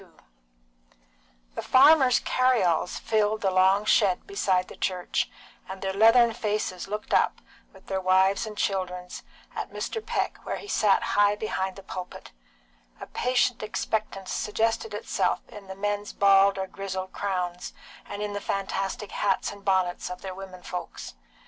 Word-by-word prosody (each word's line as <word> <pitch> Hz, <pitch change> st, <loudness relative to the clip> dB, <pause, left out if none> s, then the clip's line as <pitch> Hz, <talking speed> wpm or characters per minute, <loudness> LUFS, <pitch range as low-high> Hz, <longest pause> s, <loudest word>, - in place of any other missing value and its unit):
XXII. -, -, -21 dB, 1.3 s
The -, -, -4 dB
farmers' 270 Hz, -2 st, +6 dB
carry 255 Hz, -3 st, +2 dB
alls 175 Hz, 0 st, 0 dB
filled 215 Hz, -1 st, 0 dB
the 195 Hz, -, +1 dB
long 190 Hz, +2 st, +4 dB
shed 195 Hz, -4 st, +3 dB
beside 190 Hz, -, 0 dB
the -, -, -11 dB
church, 180 Hz, -2 st, -1 dB, 0.4 s
and 190 Hz, 0 st, -6 dB
their 190 Hz, 0 st, -1 dB
leathern 225 Hz, +3 st, +6 dB
faces 210 Hz, -5 st, -2 dB
looked 210 Hz, +2 st, -5 dB
up, -, -, +3 dB, 0.3 s
with 190 Hz, -1 st, -18 dB
their 190 Hz, -1 st, -2 dB
wives' 190 Hz, +3 st, +3 dB
and 210 Hz, -1 st, -8 dB
children's, 180 Hz, -2 st, -2 dB, 0.3 s
at -, -, -4 dB
Mr. 445 Hz, -, -4 dB
Peck -, -, -2 dB
where -, -, -3 dB
he -, -, -9 dB
sat 210 Hz, -, +3 dB
high 205 Hz, 0 st, +3 dB
behind 190 Hz, -3 st, -3 dB
the 195 Hz, -, -11 dB
pulpit; 185 Hz, -1 st, -8 dB, 0.7 s
a -, -, -7 dB
patient 250 Hz, -1 st, 0 dB
expectance 215 Hz, -2 st, -3 dB
suggested 225 Hz, -, -1 dB
itself -, -, -1 dB
in 205 Hz, -2 st, -11 dB
the 190 Hz, -, -7 dB
men's 205 Hz, +1 st, -3 dB
bald 195 Hz, 0 st, +5 dB
or 190 Hz, -, -2 dB
grizzled 190 Hz, -1 st, -5 dB
crowns, 180 Hz, -3 st, -3 dB, 0.4 s
and 205 Hz, +1 st, -5 dB
in 205 Hz, -1 st, -3 dB
the 205 Hz, -, -4 dB
fantastic 195 Hz, +1 st, -3 dB
hats 200 Hz, -2 st, 0 dB
and 200 Hz, -1 st, -12 dB
bonnets 185 Hz, -3 st, 0 dB
of 180 Hz, -, -7 dB
their 190 Hz, -1 st, -5 dB
women 185 Hz, -1 st, -10 dB
folks. 180 Hz, -, -6 dB
195 Hz, 155 wpm, -26 LUFS, 190-215 Hz, 1.3 s, farmers